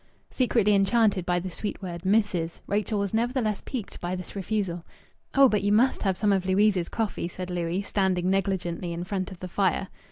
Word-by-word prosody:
Secretly 230 -5 +2
enchanted 200 -2 +3
by 175 0 +2
the 180 +1 -3
sweet 205 +4 -3
word 170 -2 -5
"missis," 190 -5 +1
Rachel 210 +1 -1
was 200 0 -1
nevertheless 230 -2 0
piqued 245 -6 -6
by 175 +1 -2
this 185 +2 -8
refusal. 195 -3 -2 0.5
"Oh, 275 0 +8
but 210 -4 +1
you 205 +1 +1
must 235 +6 +3
have 190 -3 +1
some 205 0 +2
of 190 -1 0
Louise's 190 -2 +3
coffee," 215 -6 -2
said 180 +1 -6
Louis, 175 +2 -1
standing 190 -3 0
negligently 180 -3 -1
in 170 +1 -4
front 185 +1 -3
of 185 - -10
the 185 - -5
fire. 190 0 0
195 Hz, 190 wpm, -26 LUFS, 180-210 Hz, 0.5 s, Oh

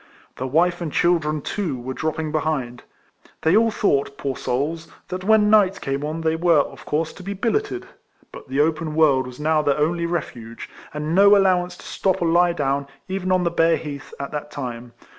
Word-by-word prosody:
The 130 - -3
wife 175 +6 +2
and 165 -3 -3
children, 155 -3 +1
too, 160 -6 -3
were 130 +2 -5
dropping 155 +1 -3
behind. 145 -6 -2 0.6
They 160 +4 +4
all 225 +1 +5
thought, 140 -10 0
poor 135 -2 -3
souls! 150 +8 -2 0.2
that 185 0 -4
when 210 0 +4
night 195 -3 +4
came 135 +1 -3
on 155 +2 -3
they 160 0 +1
were, 165 -2 +4
of - - -9
course, 155 +2 -1
to - - -12
be 200 +2 -5
billeted; 370 - -1 0.5
but - - -11
the 135 +2 +1
open 155 0 0
world 140 -5 +3
was 125 +1 -11
now 155 +1 +2
their 145 -1 +1
only 170 +3 0
refuge; 120 -9 -5 0.2
and 150 +1 -3
no 200 +2 +7
allow 190 -2 +4
ance 175 0 -8
to - - -14
stop 190 -1 0
or 170 - 0
lie 175 +1 +4
down, 140 -3 -1 0.2
even 185 -1 -2
on 185 -1 +3
the 170 - 0
bare 165 0 +3
heath, 145 -2 -8
at 140 - -5
that 150 0 -5
time. 125 -4 -6
160 Hz, 200 wpm, -22 LUFS, 140-180 Hz, 0.6 s, no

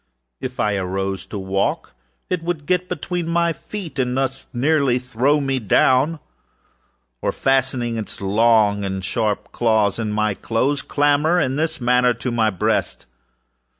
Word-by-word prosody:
If 130 -1 -6
I 105 -1 +1
arose 95 0 -3
to 105 - -6
walk 95 0 -1 0.3
it 180 -2 -1
would 165 -3 -3
get 180 +1 0
between 175 0 -3
my 170 0 +1
feet 180 -5 -7
and 125 0 0
thus 135 0 -2
nearly 135 0 +2
throw 125 +4 +1
me 135 -2 -1
down, 130 +7 +3 1.0
or, - - 0
fastening 130 -3 0
its 110 - -6
long 105 0 +3
and 95 -1 -3
sharp 105 0 -1
claws 110 -3 +1
in 110 -2 -2
my 105 0 +1
dress, 130 +8 -1
clamber, 145 +4 +2
in 130 -5 0
this 160 +2 -1
manner, 125 0 +3
to 115 +2 -4
my 115 -2 +2
breast. 95 -4 -1
125 Hz, 150 wpm, -21 LUFS, 105-145 Hz, 1.0 s, down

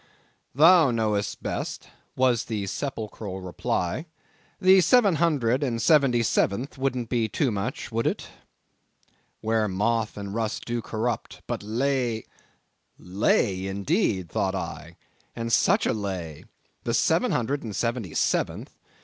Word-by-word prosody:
"Thou 165 +1 +7
knowest 110 -3 -1
best," - - -4 0.3
was 125 -3 +2
the 105 -3 -3
sepulchral 105 -4 -5
reply, 90 - -2 0.5
"the 190 0 +6
seven 205 -4 +4
hundred 140 -7 +2
and 120 -5 -1
seventy 130 -2 +4
seventh 115 +4 0
wouldn't 130 -3 -2
be 115 -2 0
too 135 +3 0
much, 120 +8 -4
would 115 +1 0
it?—'where 110 -1 -6
moth 105 +3 0
and 100 -1 -5
rust 110 -1 -2
do 120 0 -2
corrupt, 115 0 -3
but - - -3
lay—'" 120 +1 -1 0.7
Lay, 95 0 +1
indeed, 100 - 0
thought - - -1
I, 85 +3 -6 0.4
and 115 0 -3
such - - +3
a - - +2
lay! 95 -7 -5 0.4
the - - 0
seven - - +2
hundred 135 +4 0
and 110 -4 -6
seventy 115 -8 -2
seventh! - - -1
115 Hz, 125 wpm, -26 LUFS, 100-130 Hz, 0.7 s, Thou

